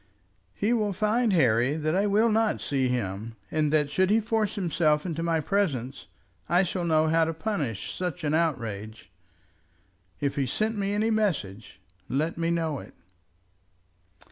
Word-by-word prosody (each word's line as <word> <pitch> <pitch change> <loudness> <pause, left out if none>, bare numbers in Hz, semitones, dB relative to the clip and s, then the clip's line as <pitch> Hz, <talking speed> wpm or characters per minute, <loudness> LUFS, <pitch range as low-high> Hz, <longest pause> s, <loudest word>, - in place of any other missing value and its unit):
"He 215 +4 +1
will 210 -4 0
find, 220 +4 +1
Harry, 130 - +3
that 155 +1 -1
I 200 +2 +2
will 215 +3 +3
not 220 0 +1
see 135 -2 0
him; 115 -2 -3 0.2
and 155 -2 +1
that 150 -2 +2
should 185 +4 +2
he 215 +2 +4
force 220 -2 -1
himself 160 -5 +1
into 165 -2 -3
my 165 -1 +1
presence, 145 - -1 0.4
I 175 +2 +4
shall 180 -1 -2
know 160 -1 +3
how 165 +1 +4
to 165 0 -3
punish 160 - -3
such 180 -5 -4
an 150 0 0
outrage. 115 - -2 1.1
If 140 -1 -2
he 135 -2 +1
sent 220 - -1
me 200 -1 -1
any 215 +2 +1
message, 120 - -2 0.3
let 155 +5 0
me 165 0 -1
know 165 -4 -1
it." - - -13
165 Hz, 160 wpm, -27 LUFS, 140-205 Hz, 1.1 s, he